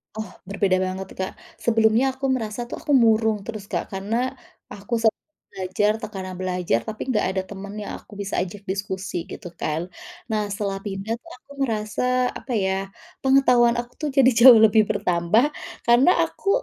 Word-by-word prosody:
Oh, 220 -4 -5 0.2
berbeda 195 -1 +1
banget, 185 0 -3
Kak. 190 - -2 0.3
Sebelumnya 230 +3 +3
aku 270 +1 -4
merasa 230 -2 -2
tuh 240 - -7
aku - - -4
murung 220 -2 +2
terus, 215 -3 -7
Kak, - - -3
karena 225 +6 -1 0.4
aku 205 +4 -4
set 225 -1 +3 0.4
belajar 190 +2 0
tekanan 190 -3 -6
belajar, 180 -8 0
tapi 220 +3 -5
enggak 215 - +1
ada 190 - -1
temen 200 0 -8
yang - - -6
aku 210 - -16
bisa 200 - -2
ajak 190 +3 -5
diskusi 190 -2 -3
gitu, - - -8
kan. 160 +3 -2 0.4
Nah, 210 -1 0
setelah 200 -1 -2
pindah 200 +2 -3
tuh 335 +4 -15
aku 280 - -22
merasa 215 -3 -2 0.3
apa 265 - -9
ya, 190 0 -1 0.3
pengetahuan 250 -3 +4
aku 240 0 -6
tuh 305 - -2
jadi 265 -2 +7
jauh 240 -2 +10
lebih 215 0 +5
bertambah, 180 - +2 0.4
karena 240 +6 +6 0.2
aku - - -15
210 Hz, 165 wpm, -23 LUFS, 190-235 Hz, 0.4 s, jauh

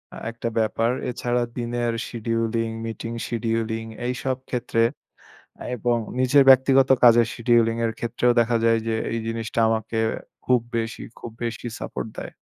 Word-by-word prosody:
আ - - -8
একটা 115 0 -5
ব্যাপার। 115 +1 +1 0.2
এছাড়া 120 0 -1 0.2
দিনের 120 0 -1 0.2
শিডিউলিং, 115 0 -1 0.2
মিটিং 115 +1 -5 0.2
শিডিউলিং 115 -1 -1 0.2
এইসব 130 +1 -2
ক্ষেত্রে 120 -2 0 0.9
এবং 120 0 +1 0.2
নিজের 130 +2 +5
ব্যক্তিগত 135 0 +6
কাজের 120 -1 +7
শিডিউলিং 115 -1 +3
এর 115 - 0
ক্ষেত্রেও 120 +1 +1
দেখা 120 0 +2
যায় 115 0 +4
যে 115 - 0 0.2
এই 115 - -1
জিনিসটা 115 0 -3
আমাকে 110 0 -2 0.5
খুব 125 -1 +4 0.2
বেশি 115 0 -3 0.2
খুব 115 - -8
বেশি 120 +1 -4
সাপোর্ট - - -5
দেয়। - - -7
115 Hz, 140 wpm, -24 LUFS, 115-120 Hz, 0.9 s, কাজের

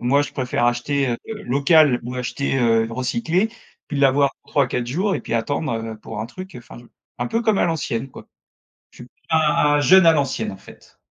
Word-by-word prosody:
Moi 140 +4 +2
je 145 - -6
préfère 125 -3 -1
acheter, 130 +3 0
heu, 120 - -1 0.3
local 140 0 +3
ou 125 +2 -6
acheter, 135 +2 -2
heu, 115 -2 +3
recyclé 175 - -1 0.4
puis 145 - -3
l'avoir 140 0 +3
3-4 125 -4 0
jours 185 +10 -1
et - - -6
puis - - -5
attendre, 145 +4 -1
heu, 110 -1 -5
pour 110 0 -7
un 110 - -4
truc 185 +10 -10
enfin 120 0 -12
je 120 - -15 0.3
un 120 - -2
peu 230 - -1
comme 220 -3 +2
à - - +3
l'ancienne, 135 -6 -2
quoi. - - -12 0.6
Je - - -22
suis - - -9
p - - -25 0.2
un 150 -2 +3
jeune 190 +4 +6
à 165 - +8
l'ancienne, 135 -6 -1
en 95 - -9
fait. - - -17
135 Hz, 205 wpm, -21 LUFS, 120-155 Hz, 0.6 s, à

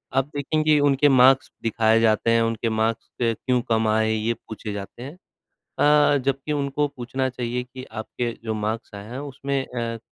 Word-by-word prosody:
आप 135 0 +3
देखें, 155 +2 0
कि 155 -1 +4
उनके 145 0 +4
मार्क्स 130 0 +5
दिखाए 115 0 +3
जाते 115 0 +2
हैं, 115 0 +4
उनके 115 0 0
मार्क्स 110 +1 -1
क्यों 120 +2 +1
कम 110 -1 +2
आए, 110 0 +2
ये 110 +2 0
पूछे 110 -2 -8
जाते 100 +4 -7
हैं। 140 +4 -8 0.7
अ, 145 -1 +5
जबकि 135 +2 -1
उनको 145 +1 0
पूछना 130 0 -3
चाहिए 125 0 -3
कि 130 +1 -10
आपके 115 +2 -4
जो 110 -1 -2
मार्क्स 110 +1 -3
आए 100 0 -8
हैं, 125 - -6
उसमें 140 -1 -4
अ, 115 -2 -4
120 Hz, 180 wpm, -23 LUFS, 110-135 Hz, 0.7 s, मार्क्स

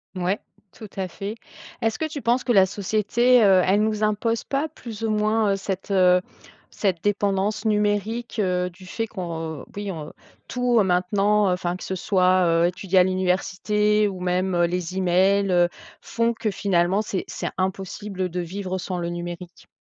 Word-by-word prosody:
Ouais. 185 +3 -1 0.3
Tout 215 - -11
à 190 - -1
fait. 200 +4 -6 0.5
Est-ce 225 -1 0
que 315 - -1
tu 310 -2 -5
penses 245 +2 +1
que 245 - 0
la 195 -4 +6
société, 215 +5 +2
heu, 190 -2 +6
elle 195 +3 +3
nous 215 0 -1
impose 215 +2 0
pas, 280 +3 -1
plus 230 -7 -9
ou 225 - 0
moins, 215 0 +2
heu, - - +1
cette, 195 0 -5
heu, 180 -2 +4 0.5
cette 185 -5 -1
dépendance 205 +1 0
numérique, 210 +2 0
heu, 180 -2 0
du 185 +1 -16
fait 225 +5 -3
qu'on 165 -7 -5
oui, 205 -1 -4
on 155 -4 -7 0.3
tout, 245 -1 +1
heu, - - +5
maintenant, 195 +3 +2
heu, - - +2
enfin, 180 -1 -2
que 185 - -9
ce 190 - -3
soit, 185 -1 +3
heu, 165 0 +3
étudier 185 +1 +1
à - - +7
l'université, 190 +3 +1
ou 190 -2 -5
même, 180 +1 0
heu, 175 0 +3
les 180 0 -3
e-mails, 190 +2 +2
heu, 175 -1 +4 0.3
font 230 0 0
que, 220 -2 -2
finalement, 190 0 +1
c'est 200 -3 -3
c'est - - -4
impossible 190 0 -3
de 180 +1 -4
vivre 185 +2 -4
sans 180 -1 -4
le 170 - -3
numérique? 175 0 -7
195 Hz, 180 wpm, -23 LUFS, 180-210 Hz, 0.5 s, à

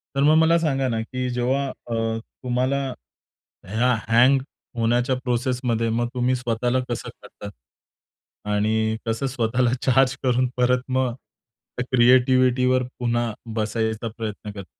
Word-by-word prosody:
तर 140 - +2
मग 155 +2 +5
मला 160 +1 +5
सांगा 135 -5 0
ना, 115 -1 -1
की 125 +2 -4
जेव्हा 130 +3 0
अ, 115 -2 -3 0.2
तुम्हाला 130 +2 0 0.8
ह्या 120 +5 +1 0.2
हँग 130 +4 +5 0.4
होण्याच्या 120 +3 +1
प्रोसेसमध्ये, 125 -2 0
मग 120 +1 0
तुम्ही 125 +1 +1
स्वतःला 120 +1 -1
कसं 120 - -4
काढतात? 100 - -11 1.0
आणि 110 +1 +1
कसं 115 +4 -1
स्वतःला 125 -1 0
चार्ज 135 +1 +3
करून 125 0 +2
परत 125 0 +2
मग 130 -2 0
त्या 125 0 -11
क्रिएटिविटीवर 125 +1 +4 0.2
पुन्हा 120 -1 0 0.2
बसायचा 110 +1 -1
प्रयत्न 105 -2 -5
करता? 100 -2 -9
125 Hz, 125 wpm, -23 LUFS, 115-130 Hz, 1.0 s, मग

